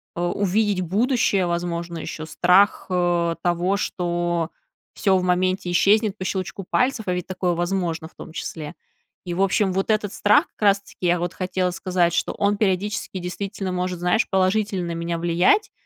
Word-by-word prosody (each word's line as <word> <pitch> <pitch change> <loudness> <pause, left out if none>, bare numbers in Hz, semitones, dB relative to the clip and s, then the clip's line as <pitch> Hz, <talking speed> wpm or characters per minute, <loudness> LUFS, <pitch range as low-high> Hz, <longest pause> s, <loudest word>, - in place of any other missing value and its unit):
э, 175 - -3
увидеть 200 +2 +1
будущее, 210 +1 +1
возможно, 170 0 -3
ещё 155 0 -6
страх, 180 +5 +3
э, 175 -2 +1
того, 175 +3 +1
что 175 -3 -1 0.4
всё 195 -2 +2
в 185 - -1
моменте 185 0 +1
исчезнет 210 +3 +3
по 185 - -5
щелчку 190 0 -3
пальцев, 250 -4 +1
а 180 - +1
ведь 180 -1 -4
такое 185 -1 -1
возможно, 175 -2 -2
в - - -31
том - - -10
числе. 155 -2 -6 0.5
И, 175 - -3
в 180 - -1
общем, 195 0 +2
вот 195 +3 -1
этот 210 -2 0
страх 210 +1 +4
как - - -29
раз-таки, 200 0 -2
я 175 0 +2
вот 175 0 -3
хотела 185 0 -1
сказать, 180 -2 0
что - - 0
он 205 0 +1
периодически 200 -1 -1
действительно 190 +2 -4
может, 180 -1 -2
знаешь, 180 +6 +2
положительно 190 -1 +1
на - - -3
меня 170 0 -2
влиять, 175 - +2
185 Hz, 170 wpm, -23 LUFS, 175-200 Hz, 0.5 s, страх